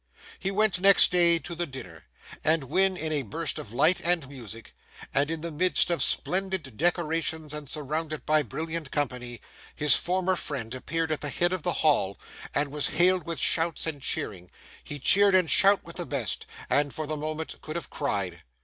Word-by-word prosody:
He 195 Hz, -, -2 dB
went 210 Hz, -1 st, +1 dB
next 195 Hz, +1 st, +5 dB
day 170 Hz, -1 st, +4 dB
to 170 Hz, -, -8 dB
the 170 Hz, +1 st, -3 dB
dinner; 115 Hz, -, -10 dB, 0.4 s
and 155 Hz, -1 st, +2 dB
when 190 Hz, +7 st, +3 dB
in 160 Hz, -2 st, -3 dB
a 150 Hz, -2 st, +1 dB
burst 145 Hz, +6 st, -3 dB
of 105 Hz, -, -9 dB
light 155 Hz, +9 st, +3 dB
and 170 Hz, -5 st, 0 dB
music, 115 Hz, -5 st, -11 dB, 0.4 s
and 140 Hz, +2 st, +2 dB
in 165 Hz, -1 st, -4 dB
the 170 Hz, 0 st, -5 dB
midst 175 Hz, +2 st, +3 dB
of 170 Hz, -, -1 dB
splendid 185 Hz, -, 0 dB
decorations 160 Hz, -1 st, -1 dB
and 150 Hz, -2 st, -5 dB
surrounded 155 Hz, +1 st, -4 dB
by 155 Hz, 0 st, +3 dB
brilliant 160 Hz, 0 st, -6 dB
company, 125 Hz, -5 st, -4 dB, 0.3 s
his 150 Hz, -1 st, +7 dB
former 185 Hz, +1 st, 0 dB
friend 125 Hz, -9 st, -6 dB
appeared 160 Hz, +5 st, -4 dB
at 155 Hz, -, -2 dB
the 145 Hz, -, -2 dB
head 175 Hz, +5 st, 0 dB
of 185 Hz, -, -4 dB
the 175 Hz, +2 st, 0 dB
Hall, 100 Hz, -10 st, +1 dB, 0.4 s
and 140 Hz, 0 st, 0 dB
was 150 Hz, 0 st, +1 dB
hailed 180 Hz, -1 st, +2 dB
with 170 Hz, -1 st, -3 dB
shouts 165 Hz, 0 st, +2 dB
and 155 Hz, -4 st, -5 dB
cheering, 90 Hz, -8 st, -1 dB, 0.3 s
he 145 Hz, -, -7 dB
cheered 200 Hz, +7 st, +5 dB
and 180 Hz, -4 st, +3 dB
shouted 200 Hz, 0 st, +5 dB
with 170 Hz, -, -10 dB
the 175 Hz, -, -3 dB
best, 130 Hz, -8 st, -3 dB, 0.2 s
and 145 Hz, -1 st, 0 dB
for 155 Hz, -, -4 dB
the 155 Hz, +1 st, -3 dB
moment 155 Hz, +1 st, -6 dB
could 155 Hz, -, -8 dB
have 170 Hz, -, -6 dB
cried. 95 Hz, -, -4 dB
155 Hz, 190 wpm, -26 LUFS, 140-175 Hz, 0.4 s, his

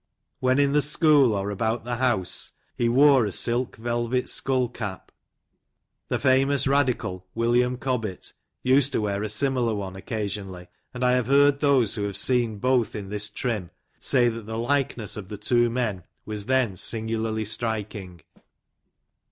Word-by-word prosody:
"When 130 Hz, +1 st, +2 dB
in 140 Hz, -1 st, +3 dB
the 150 Hz, +1 st, +3 dB
school, 145 Hz, -3 st, +4 dB
or 100 Hz, 0 st, -2 dB
about 110 Hz, +3 st, -1 dB
the 120 Hz, 0 st, -3 dB
house, 120 Hz, -8 st, -1 dB, 0.2 s
be 120 Hz, -, +1 dB
wore 135 Hz, +1 st, +5 dB
a -, -, -4 dB
silk 120 Hz, +6 st, -1 dB
velvet 120 Hz, +2 st, -1 dB
skull 130 Hz, -2 st, 0 dB
cap. 110 Hz, -5 st, -7 dB, 1.0 s
The -, -, +1 dB
famous 135 Hz, +1 st, +2 dB
radical, 125 Hz, -10 st, 0 dB
William 120 Hz, +2 st, +2 dB
Cobbett, 115 Hz, -8 st, -3 dB, 0.3 s
used 135 Hz, +2 st, +3 dB
to -, -, +1 dB
wear 100 Hz, -1 st, -1 dB
a 110 Hz, -, -3 dB
similar 120 Hz, 0 st, 0 dB
one, 95 Hz, -2 st, -5 dB
occasionally; 95 Hz, -3 st, -5 dB, 0.2 s
and 125 Hz, 0 st, -2 dB
I 125 Hz, -, +4 dB
have 125 Hz, -2 st, +1 dB
heard 140 Hz, +1 st, +4 dB
those 135 Hz, -8 st, +3 dB
who 105 Hz, -3 st, -2 dB
have 100 Hz, -1 st, -3 dB
seen 120 Hz, -2 st, +1 dB
both 125 Hz, +1 st, +1 dB
in 100 Hz, -2 st, -6 dB
this 105 Hz, 0 st, -1 dB
trim, 105 Hz, -8 st, -3 dB, 0.3 s
say 125 Hz, -3 st, +3 dB
that 115 Hz, -2 st, -4 dB
the 110 Hz, 0 st, -4 dB
likeness 120 Hz, -4 st, -1 dB
of 100 Hz, -3 st, -7 dB
the 105 Hz, +1 st, -7 dB
two 120 Hz, +3 st, +2 dB
men, 115 Hz, -7 st, -2 dB, 0.2 s
was 105 Hz, -1 st, -5 dB
then 130 Hz, -6 st, +1 dB
singularly 110 Hz, +2 st, -2 dB
striking. 105 Hz, -5 st, -4 dB
115 Hz, 160 wpm, -25 LUFS, 105-130 Hz, 1.0 s, wore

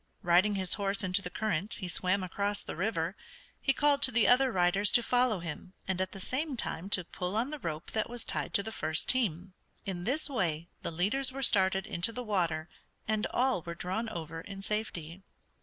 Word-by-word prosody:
Riding 180 Hz, +4 st, +4 dB
his 185 Hz, -2 st, 0 dB
horse 200 Hz, +2 st, +1 dB
into 185 Hz, +1 st, +3 dB
the 180 Hz, -, -5 dB
current 205 Hz, +1 st, -1 dB
he 185 Hz, -, -5 dB
swam 185 Hz, +2 st, +2 dB
across 200 Hz, +3 st, -1 dB
the -, -, -6 dB
river. 175 Hz, -1 st, -1 dB, 0.5 s
He 270 Hz, -, +3 dB
called 285 Hz, 0 st, +3 dB
to 260 Hz, -, +5 dB
the 230 Hz, -2 st, +4 dB
other 255 Hz, +1 st, +5 dB
riders 190 Hz, +2 st, +3 dB
to 240 Hz, -, +6 dB
follow 245 Hz, -5 st, +2 dB
him, 170 Hz, +3 st, -6 dB
and 185 Hz, -1 st, 0 dB
at 185 Hz, -, -1 dB
the 195 Hz, -, -9 dB
same 265 Hz, -, -2 dB
time 185 Hz, -3 st, -3 dB
to 185 Hz, -3 st, +2 dB
pull 180 Hz, +3 st, -4 dB
on 240 Hz, +6 st, 0 dB
the 300 Hz, -, -5 dB
rope 160 Hz, -, -5 dB
that 220 Hz, +1 st, -1 dB
was 240 Hz, -1 st, -2 dB
tied -, -, -2 dB
to 200 Hz, -, +4 dB
the 220 Hz, -, -5 dB
first 155 Hz, -6 st, -1 dB
team. 190 Hz, -7 st, +1 dB, 0.3 s
In 180 Hz, -3 st, -4 dB
this 275 Hz, +7 st, 0 dB
way 170 Hz, -, -1 dB
the -, -, -3 dB
leaders 205 Hz, +11 st, 0 dB
were 270 Hz, +1 st, -4 dB
started 190 Hz, -4 st, +4 dB
into 170 Hz, +6 st, 0 dB
the 250 Hz, +2 st, -5 dB
water, 175 Hz, -7 st, 0 dB, 0.4 s
and 215 Hz, 0 st, +1 dB
all 255 Hz, -6 st, +1 dB
were 170 Hz, +1 st, -6 dB
drawn 190 Hz, +7 st, -2 dB
over 165 Hz, -5 st, -6 dB
in 195 Hz, +2 st, -8 dB
safety. 190 Hz, -5 st, -4 dB
195 Hz, 205 wpm, -31 LUFS, 175-230 Hz, 0.5 s, to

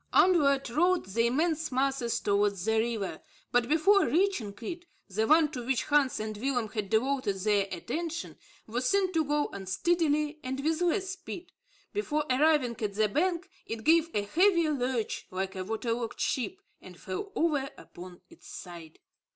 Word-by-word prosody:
Onward 285 Hz, -7 st, +4 dB
rolled 350 Hz, +7 st, +2 dB
the 230 Hz, +5 st, +1 dB
immense 310 Hz, +4 st, 0 dB
masses 260 Hz, -2 st, 0 dB
towards 200 Hz, -2 st, +1 dB
the 220 Hz, 0 st, +2 dB
river, 220 Hz, -4 st, -2 dB, 0.3 s
but 245 Hz, 0 st, +2 dB
before 380 Hz, +6 st, +4 dB
reaching 340 Hz, -, +1 dB
it 345 Hz, +8 st, -6 dB, 0.2 s
the 215 Hz, +3 st, -1 dB
one 310 Hz, -1 st, +5 dB
to 250 Hz, -5 st, -5 dB
which 260 Hz, +1 st, 0 dB
Hans 290 Hz, -3 st, +2 dB
and 215 Hz, 0 st, -4 dB
Willem 245 Hz, -1 st, -1 dB
had 205 Hz, -2 st, -4 dB
devoted 255 Hz, -1 st, +1 dB
their 200 Hz, 0 st, +1 dB
attention 320 Hz, -, -4 dB, 0.3 s
was 245 Hz, +3 st, -1 dB
seen 385 Hz, -2 st, +2 dB
to 320 Hz, -1 st, +2 dB
go 295 Hz, 0 st, 0 dB
unsteadily 300 Hz, -, 0 dB
and 260 Hz, +1 st, -3 dB
with 315 Hz, +4 st, 0 dB
less 370 Hz, +2 st, +1 dB
speed. 370 Hz, -1 st, -8 dB, 0.4 s
Before 305 Hz, -8 st, -1 dB
arriving 260 Hz, -4 st, +2 dB
at 205 Hz, -2 st, -2 dB
the 215 Hz, 0 st, +2 dB
bank, 345 Hz, -, 0 dB, 0.2 s
it 225 Hz, -1 st, -5 dB
gave 330 Hz, +1 st, +4 dB
a 205 Hz, -, +1 dB
heavy 340 Hz, -, +3 dB
lurch, 250 Hz, -5 st, -2 dB
like 190 Hz, +1 st, -3 dB
a 185 Hz, -, -3 dB
water 225 Hz, +4 st, -2 dB
logged 230 Hz, -1 st, -4 dB
ship, 355 Hz, +9 st, -1 dB, 0.2 s
and 180 Hz, -2 st, -13 dB
fell 195 Hz, -, -5 dB
over 290 Hz, -5 st, +1 dB
upon 175 Hz, 0 st, -12 dB
its -, -, -16 dB
side. 170 Hz, -3 st, -10 dB
265 Hz, 165 wpm, -29 LUFS, 215-325 Hz, 0.4 s, one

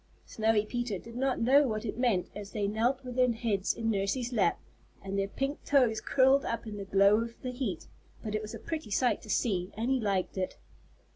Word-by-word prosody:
Snowy 220 Hz, -1 st, +1 dB
Peter 240 Hz, -3 st, -2 dB
did 230 Hz, +5 st, -12 dB
not 265 Hz, +1 st, 0 dB
know 275 Hz, +5 st, +5 dB
what 215 Hz, -1 st, -3 dB
it 210 Hz, -, -3 dB
meant 230 Hz, -7 st, +1 dB
as 205 Hz, -1 st, -7 dB
they 205 Hz, -2 st, 0 dB
knelt 240 Hz, +6 st, 0 dB
with 250 Hz, -1 st, -7 dB
their 250 Hz, -1 st, +4 dB
heads 220 Hz, -4 st, 0 dB
in 225 Hz, -1 st, -1 dB
Nursey's 220 Hz, +5 st, -1 dB
lap, 195 Hz, -7 st, +2 dB, 0.4 s
and 195 Hz, 0 st, -4 dB
their 195 Hz, 0 st, 0 dB
pink 275 Hz, +7 st, -3 dB
toes 245 Hz, -6 st, +3 dB
curled 270 Hz, +1 st, +4 dB
up 230 Hz, 0 st, -3 dB
in 215 Hz, -2 st, -6 dB
the 200 Hz, -, -5 dB
glow 200 Hz, +2 st, +5 dB
of 230 Hz, 0 st, -6 dB
the 255 Hz, -, -2 dB
heat, 245 Hz, -, -3 dB, 0.4 s
but 215 Hz, -, -4 dB
it 215 Hz, -, 0 dB
was 215 Hz, 0 st, -7 dB
a -, -, -8 dB
pretty 315 Hz, -9 st, -5 dB
sight 245 Hz, +5 st, +1 dB
to 215 Hz, -, -13 dB
see, 190 Hz, -3 st, 0 dB
and 235 Hz, +4 st, -1 dB
he 265 Hz, -, +2 dB
liked 195 Hz, -3 st, -1 dB
it. 185 Hz, -, -3 dB
225 Hz, 220 wpm, -30 LUFS, 200-250 Hz, 0.4 s, know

